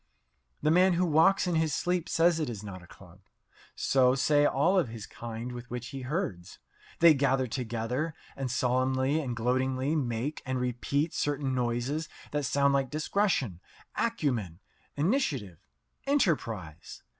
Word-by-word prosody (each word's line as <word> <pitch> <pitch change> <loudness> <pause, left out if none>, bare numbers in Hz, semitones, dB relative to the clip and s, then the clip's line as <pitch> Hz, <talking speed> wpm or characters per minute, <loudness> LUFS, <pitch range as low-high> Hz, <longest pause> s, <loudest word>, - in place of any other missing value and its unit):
The 155 - +3
man 180 +2 +5
who 180 +1 +2
walks 175 +5 +4
in 180 - 0
his 160 -2 +1
sleep 180 -1 -1
says 165 0 +3
it 155 - -1
is 105 -3 -6
not 95 -3 -8
a 85 - -15
club. - - -16 0.6
So 130 -1 +3
say 145 +2 +3
all 175 +8 +3
of 170 - 0
his 110 -2 -7
kind 115 +1 -7
with 120 -1 -8
which 120 0 -5
he 135 -2 -6
herds. 125 - -4 0.4
They 170 -1 +9
gather 135 -2 +2
together 125 +5 -3 0.2
and 135 -2 -3
solemnly 130 +3 +1
and 125 -5 -3
gloatingly 130 +4 0
make 130 0 -2
and 130 -1 -2
repeat 125 +5 -1
certain 145 -2 -1
noises 125 +6 -1 0.2
that 145 -1 -1
sound 140 +1 +2
like 135 -2 +1
"discretion," 155 - 0 0.4
"acumen," 125 - -1 0.4
"initiative," 145 - 0 0.5
"enterprise." 115 - -1
135 Hz, 145 wpm, -29 LUFS, 120-155 Hz, 0.6 s, They